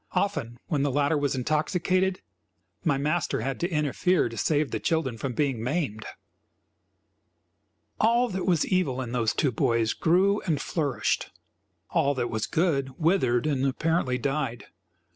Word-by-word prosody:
Often, 120 Hz, -, -1 dB
when 150 Hz, -4 st, -1 dB
the 145 Hz, -, +1 dB
latter 145 Hz, +3 st, +1 dB
was 145 Hz, -2 st, 0 dB
intoxicated, 180 Hz, +7 st, 0 dB, 0.6 s
my 145 Hz, -5 st, +2 dB
master 150 Hz, -1 st, 0 dB
had 135 Hz, +3 st, -3 dB
to 175 Hz, -, -1 dB
interfere 150 Hz, 0 st, +1 dB
to 115 Hz, -, -9 dB
save 150 Hz, +4 st, +1 dB
the -, -, -2 dB
children 160 Hz, -7 st, 0 dB
from 125 Hz, +3 st, -4 dB
being 135 Hz, -4 st, 0 dB
maimed. 125 Hz, -4 st, -2 dB, 1.9 s
All 235 Hz, +3 st, +3 dB
that 190 Hz, -2 st, -3 dB
was 170 Hz, -4 st, +3 dB
evil 180 Hz, -9 st, 0 dB
in 125 Hz, -3 st, -4 dB
those 115 Hz, -3 st, +1 dB
two 140 Hz, -, +2 dB
boys 115 Hz, -2 st, +1 dB
grew 190 Hz, +5 st, +2 dB
and 155 Hz, -4 st, +1 dB
flourished; 140 Hz, -10 st, -1 dB, 0.6 s
all 140 Hz, +1 st, +2 dB
that 120 Hz, -2 st, -2 dB
was 110 Hz, -1 st, -2 dB
good 140 Hz, -6 st, 0 dB
withered 155 Hz, -8 st, +2 dB
and, 140 Hz, -4 st, 0 dB
apparently, 140 Hz, -1 st, +1 dB
died. 135 Hz, -2 st, -2 dB
145 Hz, 145 wpm, -27 LUFS, 125-170 Hz, 1.9 s, All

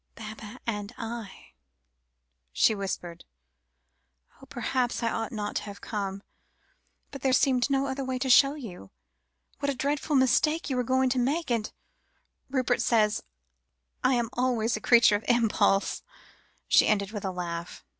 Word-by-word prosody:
"Baba 215 Hz, +1 st, -9 dB
and 210 Hz, -1 st, -4 dB
I," 225 Hz, -4 st, -7 dB, 1.0 s
she 220 Hz, -, +3 dB
whispered. 185 Hz, -4 st, -5 dB, 1.2 s
"Oh! -, -, -14 dB
perhaps 250 Hz, -2 st, -1 dB
I 230 Hz, -, +1 dB
ought 225 Hz, -1 st, -3 dB
not 210 Hz, -2 st, -3 dB
to -, -, -3 dB
have 200 Hz, -1 st, -9 dB
come, 200 Hz, -2 st, -4 dB, 0.9 s
but 275 Hz, -, -8 dB
there 265 Hz, -, +2 dB
seemed 255 Hz, -1 st, +3 dB
no 275 Hz, 0 st, +1 dB
other 270 Hz, 0 st, -3 dB
way 260 Hz, -1 st, -2 dB
to 265 Hz, +1 st, -2 dB
show 275 Hz, +3 st, +6 dB
you 190 Hz, -, -9 dB, 0.7 s
what 280 Hz, 0 st, -1 dB
a 280 Hz, -, -1 dB
dreadful 290 Hz, +3 st, -1 dB
mistake 275 Hz, +4 st, +2 dB
you -, -, 0 dB
were 250 Hz, -, +1 dB
going 260 Hz, +1 st, +1 dB
to 255 Hz, -, +1 dB
make, 285 Hz, +4 st, 0 dB
and 230 Hz, -3 st, -1 dB, 0.8 s
Rupert 255 Hz, -2 st, +1 dB
says 220 Hz, -2 st, +2 dB, 0.8 s
I 255 Hz, 0 st, +4 dB
am 235 Hz, -2 st, -1 dB
always 240 Hz, -2 st, 0 dB
a 215 Hz, -, -5 dB
creature 235 Hz, -3 st, +5 dB
of 210 Hz, -, -13 dB
impulse," 215 Hz, -4 st, +2 dB, 0.7 s
she -, -, +5 dB
ended 200 Hz, -1 st, +1 dB
with 210 Hz, -3 st, -6 dB
a -, -, -2 dB
little 185 Hz, -, -8 dB
laugh. 170 Hz, 0 st, -7 dB
235 Hz, 155 wpm, -27 LUFS, 210-260 Hz, 1.2 s, show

